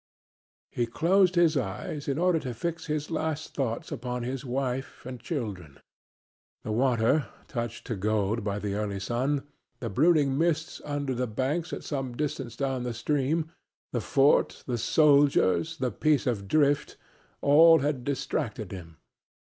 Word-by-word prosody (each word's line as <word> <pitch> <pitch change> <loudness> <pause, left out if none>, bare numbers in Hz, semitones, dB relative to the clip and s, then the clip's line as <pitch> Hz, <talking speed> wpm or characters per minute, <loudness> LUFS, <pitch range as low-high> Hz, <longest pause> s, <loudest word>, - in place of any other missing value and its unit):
He 120 -3 -1
closed 180 +9 +3
his 170 -2 +4
eyes 135 +5 -3
in 140 0 0
order 175 -1 +3
to 125 -5 -5
fix 170 +7 -4
his 150 0 -2
last 155 -1 -2
thoughts 120 -5 -3
upon 125 0 -4
his 130 +1 -4
wife 130 0 -3
and 125 -1 -6
children. 100 - -5 0.9
The 110 - -4
water, 120 +2 +2 0.2
touched 120 -2 -4
to 115 - -3
gold 105 +2 0
by 100 -1 -2
the 105 -1 -3
early 100 -1 -2
sun, 130 +7 -1 0.4
the 115 -6 -4
brooding 145 - +3
mists 160 -1 0
under 145 -2 -2
the 125 0 -1
banks 135 +10 -2
at - - -5
some 135 -4 -4
distance 135 -5 -3
down 135 -1 -1
the 120 -1 -3
stream, 150 +6 0 0.4
the 120 - -1
fort, 135 +8 +3
the 120 -2 -2
soldiers, 145 - +3
the 130 -4 -1
piece 150 +6 +1
of 105 -6 -1
drift 145 +2 +2 0.4
all 165 +3 +7
had 140 -3 -1
distracted 125 -5 -3
him. 85 -4 -9
135 Hz, 150 wpm, -28 LUFS, 115-150 Hz, 0.9 s, all